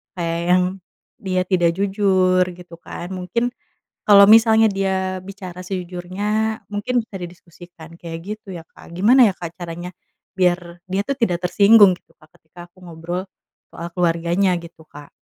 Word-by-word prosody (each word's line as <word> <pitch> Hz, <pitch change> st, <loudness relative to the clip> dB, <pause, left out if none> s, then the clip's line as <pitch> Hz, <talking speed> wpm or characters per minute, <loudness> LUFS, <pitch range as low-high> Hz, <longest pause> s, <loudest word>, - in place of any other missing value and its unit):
kayak 170 Hz, -2 st, -2 dB
yang 180 Hz, 0 st, +4 dB, 0.6 s
dia 185 Hz, -2 st, -1 dB
tidak 175 Hz, -3 st, +2 dB
jujur, 190 Hz, -2 st, +2 dB
gitu 175 Hz, -1 st, -13 dB
kan, 175 Hz, +1 st, -8 dB
mungkin 185 Hz, +7 st, -2 dB, 0.6 s
kalau 200 Hz, -1 st, +8 dB
misalnya 220 Hz, 0 st, +6 dB
dia 190 Hz, -1 st, -2 dB
bicara 185 Hz, -2 st, -9 dB
sejujurnya 190 Hz, +4 st, -3 dB
mungkin 210 Hz, +4 st, -1 dB
bisa 215 Hz, -, -14 dB
didiskusikan, 170 Hz, -1 st, -12 dB
kayak 165 Hz, -1 st, -7 dB, 0.2 s
gitu, 215 Hz, -2 st, -13 dB
ya, 165 Hz, -, -8 dB
Kak. -, -, -17 dB
Gimana 230 Hz, +6 st, +5 dB
ya, -, -, -13 dB
Kak, 170 Hz, -1 st, -8 dB
caranya 175 Hz, 0 st, -7 dB, 0.4 s
biar 175 Hz, -1 st, -1 dB
dia 195 Hz, +1 st, +1 dB
tuh 275 Hz, -, -1 dB
tidak 180 Hz, -7 st, 0 dB
tersinggung, 205 Hz, 0 st, +6 dB
gitu, -, -, -32 dB
Kak, 155 Hz, -, -20 dB
ketika 175 Hz, +2 st, -14 dB
aku 185 Hz, +1 st, -21 dB
ngobrol 170 Hz, +2 st, -5 dB, 0.5 s
soal 170 Hz, -, -7 dB
keluarganya, 175 Hz, +2 st, +1 dB
gitu, 170 Hz, -1 st, -14 dB
Kak? 145 Hz, -1 st, -14 dB
185 Hz, 150 wpm, -20 LUFS, 175-200 Hz, 0.6 s, kalau